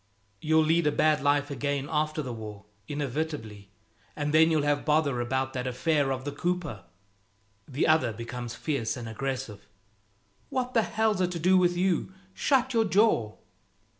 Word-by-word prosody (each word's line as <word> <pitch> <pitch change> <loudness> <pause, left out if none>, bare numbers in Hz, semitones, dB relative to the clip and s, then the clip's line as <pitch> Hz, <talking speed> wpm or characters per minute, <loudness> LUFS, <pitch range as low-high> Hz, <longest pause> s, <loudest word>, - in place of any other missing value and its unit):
"You'll 160 +1 +3
lead 160 +1 +2
a - - +3
bad 155 0 +2
life 145 0 +1
again 140 +1 -2
after 155 0 -1
the 125 -3 -5
war, 105 -3 -8 0.2
inevitably; 140 -8 -4 0.5
and 145 0 -2
then 160 +1 +6
you'll 155 -3 +2
have 145 0 +1
bother 150 -5 +1
about 130 +2 -1
that 130 -1 -3
affair 140 +2 +1
of 130 0 -3
the 145 - -2
cooper." 165 - -3 0.8
The 140 +1 0
other 155 -7 +3
becomes 115 +1 -6
fierce 140 -7 -2
and 120 -2 -6
aggressive. 125 -3 -5 0.8
"What 255 -1 -2
the 230 - +4
hell's 220 -3 0
it 180 - +2
to 170 - -4
do 185 +4 +4
with 175 -1 +3
you? 185 -1 0 0.2
Shut 260 +1 +1
your 225 -1 +3
jaw!" 195 - +2
145 Hz, 165 wpm, -28 LUFS, 125-165 Hz, 0.8 s, then